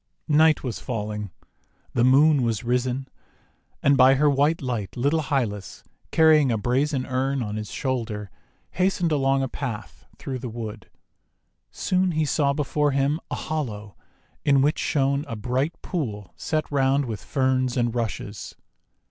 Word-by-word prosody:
Night 155 +1 +4
was 125 -4 -4
falling. 105 -4 -4 0.6
The 120 - +2
Moon 140 +3 +5
was 115 -3 -1
risen, 125 +2 -1 0.8
and 140 - +5
by 135 0 +6
her 145 +2 +3
white 145 +4 +2
light 120 -5 -4
little 145 +6 +2
Hylas, 120 -9 -2 0.3
carrying 155 -4 +5
a 115 - +1
brazen 130 +5 0
urn 135 0 -1
on 105 -1 -4
his 110 -1 -5
shoulder, 115 -7 -3 0.4
hastened 180 -2 +1
along 135 -2 +2
a - - 0
path 125 -5 -6
through 130 -2 -5
the 125 0 -5
wood. 110 -2 -7 0.8
Soon 185 -1 0
he 155 0 +1
saw 145 -1 +2
before 150 +1 0
him 140 +3 +1
a - - -2
hollow 110 -10 -4 0.5
in 140 -2 +4
which 150 +3 +1
shone 140 -2 +1
a 115 - -4
bright 130 +9 -2
pool 110 - -4
set 155 -1 -2
round 135 0 +2
with 110 -5 -5
Ferns 130 -2 0
and 120 -2 +1
Rushes. 110 -3 -4
135 Hz, 150 wpm, -24 LUFS, 115-145 Hz, 0.8 s, by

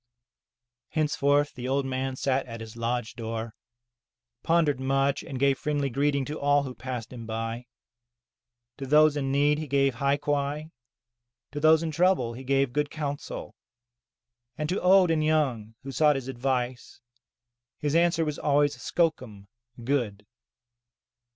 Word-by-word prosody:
Henceforth 145 -2 +1
the 125 0 -6
old 135 +1 0
man 130 0 -2
sat 130 0 0
at 115 -1 -7
his 110 0 -9
lodge 115 0 -2
door, 115 -1 -5 0.9
pondered 160 -4 +2
much, 135 +1 +1
and 135 - -7
gave 140 0 +2
friendly 145 -2 -1
greeting 140 +1 +1
to 150 +3 -5
all 145 0 +3
who 130 -2 -6
passed 125 -2 -6
him 115 -2 -8
by. 115 +2 -4 1.1
To 135 - -6
those 150 +1 +5
in 135 -2 -1
need 145 +2 +3
he 155 - -5
gave 135 -1 +2
hai 140 +4 +1
quai, 145 +2 -2 0.8
to 145 - -4
those 155 +1 +5
in 160 - -2
trouble 170 -7 +2
he 130 +3 -9
gave 135 -1 +1
good 150 0 0
counsel, 145 -2 -5 1.0
and 150 - -2
to 185 - -1
old 185 -1 +5
and 155 -1 +1
young 130 -9 0
who 135 - -6
sought 150 +3 +3
his 135 -2 -4
advice, 125 -1 -3 0.8
his 145 -1 -2
answer 170 0 +3
was 150 -1 -3
always 145 0 +2
skokum 125 - -2 0.3
(good). 115 -6 -1
140 Hz, 145 wpm, -27 LUFS, 125-150 Hz, 1.1 s, those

